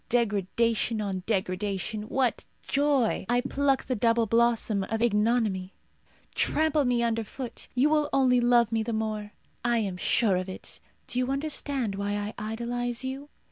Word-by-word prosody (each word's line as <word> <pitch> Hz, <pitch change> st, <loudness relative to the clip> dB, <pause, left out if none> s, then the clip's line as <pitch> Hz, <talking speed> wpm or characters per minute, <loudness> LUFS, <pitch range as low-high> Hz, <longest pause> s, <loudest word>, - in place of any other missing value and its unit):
Degradation 230 Hz, 0 st, +1 dB
on 195 Hz, -3 st, -2 dB
degradation. 200 Hz, +1 st, -2 dB
What 260 Hz, -2 st, 0 dB, 0.2 s
joy! 275 Hz, -8 st, +1 dB
I 245 Hz, 0 st, +3 dB
pluck 275 Hz, +1 st, +1 dB
the 255 Hz, -, -1 dB
double 230 Hz, +1 st, +2 dB
blossom 230 Hz, -2 st, +2 dB
of 225 Hz, +2 st, -2 dB
ignominy. 215 Hz, -4 st, +1 dB, 0.6 s
Trample 310 Hz, -2 st, +2 dB
me 245 Hz, -1 st, +2 dB
under 230 Hz, -1 st, 0 dB
foot. 240 Hz, +2 st, -8 dB
You 275 Hz, +5 st, +3 dB
will 300 Hz, -1 st, +2 dB
only 255 Hz, -2 st, +3 dB
love 240 Hz, -2 st, +4 dB
me 225 Hz, -1 st, +1 dB
the 225 Hz, +1 st, -3 dB
more. 215 Hz, -1 st, -3 dB, 0.3 s
I 240 Hz, -1 st, +2 dB
am 195 Hz, -5 st, -2 dB
sure 200 Hz, 0 st, +2 dB
of 185 Hz, +1 st, -3 dB
it. 185 Hz, -, -9 dB, 0.3 s
Do 250 Hz, -, -3 dB
you 255 Hz, 0 st, 0 dB
understand 275 Hz, -5 st, -1 dB
why 200 Hz, +1 st, -2 dB
I 205 Hz, +1 st, -3 dB
idolize 235 Hz, +3 st, -3 dB
you? 270 Hz, +2 st, -5 dB
230 Hz, 155 wpm, -27 LUFS, 210-250 Hz, 0.6 s, love